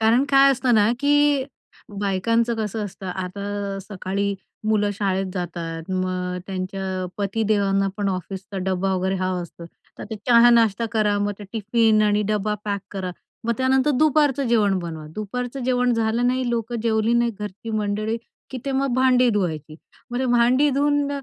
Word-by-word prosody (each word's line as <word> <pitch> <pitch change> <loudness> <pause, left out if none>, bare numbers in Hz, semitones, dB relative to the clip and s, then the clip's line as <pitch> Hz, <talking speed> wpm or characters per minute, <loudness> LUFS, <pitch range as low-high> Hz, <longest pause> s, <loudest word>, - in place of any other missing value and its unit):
कारण 230 +5 +4
काय 275 0 +7
असतं 250 -2 +1
ना, 215 +2 +4
की 290 -1 +3 0.6
बायकांचं 230 +4 +1
कसं 210 0 -3
असतं 190 -1 -8
आता 195 +2 -4
सकाळी 200 0 -3 0.3
मुलं 205 -1 +2
शाळेत 195 -2 -1
जातात, 170 -2 -4
मग 185 -1 -2
त्यांच्या 190 0 -3
पतीदेवांना 200 -1 +1
पण 205 -1 -1
ऑफिसचा 190 +1 -5
डब्बा 190 +1 -1
वगैरे 190 +1 0
हवा 185 -1 -1
असतो. 170 0 -9 0.3
तर - - -6
ते 220 - -3
चहा 240 0 +7
नाश्ता 230 -1 +3
करा. 210 -2 +2
मग 205 0 0
ते 205 - -8
टिफिन 220 0 +2
आणि 210 0 +2
डब्बा 210 0 0
पॅक 200 -1 -2
करा. 190 -2 -3 0.3
मग 235 - +1
त्यानंतर 265 +2 +3
दुपारचं 295 -3 +3
जेवण 205 -5 +3
बनवा. 160 -3 -6
दुपारचं 245 +5 -4
जेवण 250 -1 +2
झालं 230 +2 +1
नाही, 255 0 0
लोकं 235 0 -2
जेवली 220 0 +1
नाही, 235 0 +2
घरची 210 +2 -6
मंडळी 215 +1 -1 0.3
की 260 - -5
ते 275 - -2
मग 270 -1 0
भांडी 255 -1 +4
धुवायची, 160 -7 -2 0.3
मग 245 - -2
ते 260 - 0
भांडी 245 +5 +4
धुवून 290 +1 +1
210 Hz, 160 wpm, -23 LUFS, 190-240 Hz, 0.6 s, काय